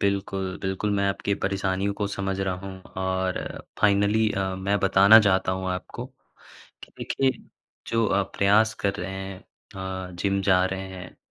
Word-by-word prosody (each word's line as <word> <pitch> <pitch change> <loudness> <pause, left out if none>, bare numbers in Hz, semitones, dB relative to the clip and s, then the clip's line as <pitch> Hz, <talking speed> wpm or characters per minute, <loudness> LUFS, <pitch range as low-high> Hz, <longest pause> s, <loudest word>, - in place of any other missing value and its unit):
बिल्कुल, 95 -1 -1
बिल्कुल, 95 +2 -1
मैं 100 -1 +1
आपकी 100 +1 -1
परेशानियों 95 0 0
को 100 0 -2
समझ 95 -1 -3
रहा 95 -1 0
हूँ। 95 -1 -8 0.2
और 95 0 -1 0.4
फ़ाइनली 105 +2 +3
अ, 95 -1 -1
मैं 100 +2 0
बताना 100 +3 +7
चाहता 95 -3 +2
हूँ 95 0 -3
आपको, 95 +7 -5
कि 130 0 -27 0.5
देखिए, 135 -1 +1 0.6
जो 115 -1 +1
आप 95 0 0
प्रयास 110 +3 +4
कर 100 -1 +1
रहे 90 +2 -4
हैं, 95 0 -6 0.7
अ, - - -12
जिम 100 0 +1
जा 90 0 +5
रहे 95 0 -4
हैं, 90 0 -10
95 Hz, 160 wpm, -25 LUFS, 95-100 Hz, 0.7 s, बताना